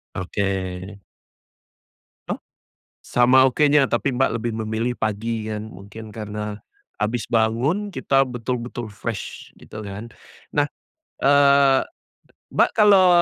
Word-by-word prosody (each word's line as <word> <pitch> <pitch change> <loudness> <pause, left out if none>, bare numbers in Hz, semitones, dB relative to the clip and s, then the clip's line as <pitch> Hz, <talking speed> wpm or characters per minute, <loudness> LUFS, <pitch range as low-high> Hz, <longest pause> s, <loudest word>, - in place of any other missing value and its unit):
Oke. 95 +2 -2 1.9
Oh? - - -1 0.7
Sama 125 +2 +5
okenya 145 +1 +4
tapi 125 +3 0
Mbak 135 - +3
lebih 115 +1 -2
memilih 110 +3 -1
pagi 110 +1 -2
kan 105 0 -4
mungkin 105 +3 -11
karena, 105 -1 -5 0.4
habis 110 +2 -2
bangun 130 - +1
kita 135 0 +2
betul-betul 120 -2 -4
fresh 100 - -6
gitu 105 -1 -10
kan. 105 +4 -7 0.4
Nah, 145 -1 +2 0.6
eee, 140 -1 +5 0.7
Mbak - - +3
kalau, 200 -4 +6
120 Hz, 105 wpm, -22 LUFS, 110-135 Hz, 1.9 s, kalau